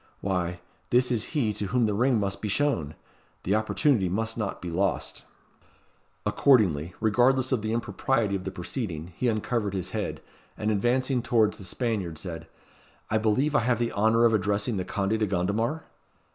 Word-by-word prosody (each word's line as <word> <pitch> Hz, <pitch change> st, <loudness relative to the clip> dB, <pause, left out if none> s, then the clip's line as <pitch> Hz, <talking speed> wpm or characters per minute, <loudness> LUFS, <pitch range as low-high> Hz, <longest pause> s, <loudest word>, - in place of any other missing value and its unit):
"Why, 90 Hz, -2 st, -2 dB, 0.3 s
this 125 Hz, +1 st, +3 dB
is 120 Hz, +6 st, -1 dB
he 110 Hz, -7 st, +1 dB
to 105 Hz, -, -3 dB
whom 120 Hz, +2 st, +2 dB
the 105 Hz, -, 0 dB
ring 120 Hz, +2 st, +2 dB
must 100 Hz, -1 st, -2 dB
be 105 Hz, -, -2 dB
shown. 100 Hz, -, 0 dB, 0.5 s
The 95 Hz, -, 0 dB
opportunity 110 Hz, -1 st, +2 dB
must 110 Hz, +4 st, -1 dB
not 105 Hz, -4 st, -3 dB
be 90 Hz, -, -5 dB
lost." 95 Hz, +3 st, -1 dB, 1.0 s
Accordingly, 105 Hz, -, +3 dB
regardless 125 Hz, +4 st, +3 dB
of 125 Hz, -4 st, +1 dB
the 110 Hz, +1 st, -2 dB
impropriety 115 Hz, -1 st, 0 dB
of 95 Hz, -, -4 dB
the 95 Hz, -, -3 dB
proceeding, 90 Hz, -, -5 dB
he 125 Hz, -, -1 dB
uncovered 110 Hz, -2 st, -1 dB
his 95 Hz, -3 st, -3 dB
head, -, -, -3 dB, 0.4 s
and 105 Hz, +1 st, 0 dB
advancing 125 Hz, +5 st, +1 dB
towards 115 Hz, -3 st, +2 dB
the 95 Hz, -, -8 dB
Spaniard 100 Hz, -6 st, -2 dB
said 80 Hz, -1 st, -7 dB, 0.6 s
"I 110 Hz, -, +3 dB
believe 115 Hz, +8 st, +1 dB
I -, -, +4 dB
have 120 Hz, 0 st, +1 dB
the 120 Hz, 0 st, -1 dB
honour 110 Hz, +3 st, +3 dB
of 115 Hz, -, +4 dB
addressing 105 Hz, +2 st, 0 dB
the 90 Hz, -, -2 dB
Conde 100 Hz, +3 st, -1 dB
de 105 Hz, -, +1 dB
Gondomar?" 105 Hz, -, -1 dB
110 Hz, 175 wpm, -27 LUFS, 95-120 Hz, 1.0 s, I